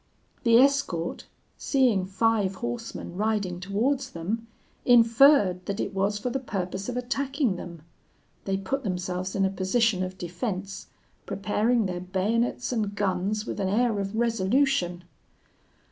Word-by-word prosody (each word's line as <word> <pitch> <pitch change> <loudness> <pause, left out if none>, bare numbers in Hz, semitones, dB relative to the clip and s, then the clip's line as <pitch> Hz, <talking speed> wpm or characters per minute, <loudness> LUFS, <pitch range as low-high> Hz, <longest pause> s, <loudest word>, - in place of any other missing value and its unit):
"The 230 -2 +5
escort, 260 -11 +1 0.3
seeing 240 -9 +2
five 200 -1 +1
horsemen 235 -4 -5
riding 205 -4 -1
towards 220 +9 -1
them, 215 +8 -4 0.4
inferred 230 -5 +5
that 200 +1 -3
it - - -2
was 200 +2 0
for 245 +4 -3
the 270 - -1
purpose 190 -4 -4
of 250 - -3
attacking 270 -2 -1
them. 170 -3 -9 0.6
They 195 0 0
put 265 +9 -3
themselves 185 -1 -3
in 195 -1 +2
a 190 - 0
position 195 +1 +1
of 185 0 -4
defence, 185 +2 -5 0.4
preparing 215 +3 +1
their 180 -2 -3
bayonets 210 +8 -1
and 210 -4 -1
guns 200 +2 -1
with - - -5
an 190 -1 0
air 220 +1 +1
of 195 +1 -3
resolution. 230 -4 +1
205 Hz, 135 wpm, -26 LUFS, 185-235 Hz, 0.6 s, The